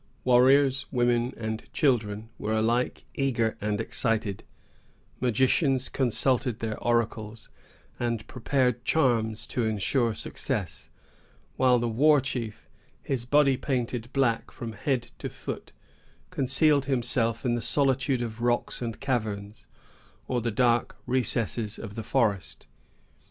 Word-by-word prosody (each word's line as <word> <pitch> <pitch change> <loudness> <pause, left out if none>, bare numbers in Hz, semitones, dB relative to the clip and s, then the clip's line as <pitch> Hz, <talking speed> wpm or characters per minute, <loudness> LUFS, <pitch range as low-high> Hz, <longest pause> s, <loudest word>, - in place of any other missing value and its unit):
Warriors, 130 +2 +4
women, 120 -1 +2
and 110 -1 -5
children 110 -6 +1
were 110 +1 -2
alike 120 +3 0
eager 120 -5 0
and 105 0 -1
excited; 110 -4 -1 0.8
magicians 130 +2 +2
consulted 125 -1 0
their 110 -1 -4
oracles, 115 -2 -1 0.5
and 115 -2 -1
prepared 125 -1 0
charms 115 -7 +1
to 125 - -2
insure 110 +2 +1
success; 105 - -4 0.7
while 125 -1 +4
the 120 0 0
war 145 +6 +4
chief, 120 -5 -5 0.4
his 125 -3 -2
body 140 -1 +4
painted 125 -3 -2
black 130 -4 +1
from 115 -1 -7
head 120 +3 -2
to - - -4
foot, - - -7 0.6
concealed 140 +2 +2
himself 120 -3 0
in 120 - +2
the 120 - -1
solitude 130 0 +1
of 115 0 -6
rocks 120 +1 0
and 115 -2 -4
caverns, 110 -6 -3 0.6
or 125 -2 0
the 120 - -1
dark 120 +1 +1
recesses 115 -3 0
of 105 -3 -7
the 115 - -5
forest. 100 - -1
120 Hz, 120 wpm, -27 LUFS, 110-130 Hz, 0.8 s, Warriors